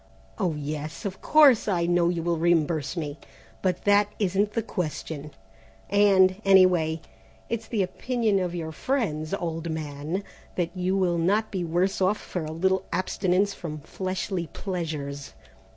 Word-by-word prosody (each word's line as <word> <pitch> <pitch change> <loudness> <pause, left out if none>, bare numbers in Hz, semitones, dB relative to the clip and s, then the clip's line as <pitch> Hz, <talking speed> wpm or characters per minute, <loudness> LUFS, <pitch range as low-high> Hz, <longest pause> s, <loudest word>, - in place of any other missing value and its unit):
Oh, 180 -6 0
yes, 150 0 -5
of 195 -2 -4
course 290 -8 +6
I 175 -4 +1
know 175 0 +3
you 170 -2 -1
will 170 -1 0
reimburse 165 -2 +1
me, 150 -2 -4 0.4
but 180 -2 0
that 205 0 +5
isn't 205 +1 +1
the 230 - 0
question; 155 -5 -4 0.6
and, 195 -1 +5
anyway, 180 -5 +4 0.5
it's 230 -1 -3
the 215 -5 0
opinion 225 +1 0
of 180 -1 -2
your 160 -2 -4
friends, 160 - -1
old 170 -3 -3
man, 155 +3 -3 0.3
that 175 0 -2
you 185 +1 0
will 175 -3 +1
not 205 +6 +1
be 185 -3 -2
worse 180 +4 0
off 190 +3 +3
for 180 - -5
a 155 - -5
little 190 +3 +1
abstinence 190 +1 +1
from 155 -5 -6
fleshly 185 +1 -3
pleasures. 150 -6 -5
180 Hz, 150 wpm, -26 LUFS, 160-195 Hz, 0.6 s, course